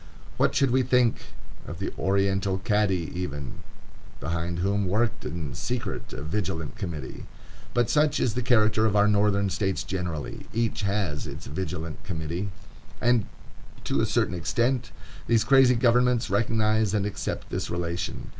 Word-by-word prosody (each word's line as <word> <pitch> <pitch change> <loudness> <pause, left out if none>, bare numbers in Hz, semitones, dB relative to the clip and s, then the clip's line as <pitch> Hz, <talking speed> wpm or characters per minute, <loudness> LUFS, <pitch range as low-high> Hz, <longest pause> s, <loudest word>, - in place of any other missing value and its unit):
What - - +2
should 135 -3 +3
we 130 +1 +4
think 125 -2 +3 0.5
of 85 - -6
the 100 - -4
oriental 95 0 +1
Cadi 95 -4 +1
even, 75 -7 -5 0.6
behind 85 +1 -2
whom 100 +2 +1
worked 110 +5 0
in 80 -6 -4
secret - - -4
a 70 - -6
Vigilant 80 -2 -3
Committee? 80 -9 -6 0.5
But 120 -1 +3
such 150 -1 +3
is 115 - +1
the 125 - -1
character 110 -3 +3
of 105 - 0
our 105 0 +5
Northern 100 -1 +2
States 95 -1 -1
generally; 85 -7 -4
each 115 -1 0
has 100 -7 -1
its 70 +1 -8
Vigilant 80 +1 -5
Committee. 85 +2 -3 0.5
And, 120 -3 +2 0.6
to - - +1
a - - +1
certain - - +1
extent, 120 +7 0 0.4
these 115 -2 +4
crazy 135 -2 +6
governments 120 -1 +3
recognize 110 0 +2
and 100 -1 +1
accept 105 - -4
this - - -2
relation. 85 0 -3
100 Hz, 145 wpm, -26 LUFS, 85-115 Hz, 0.6 s, crazy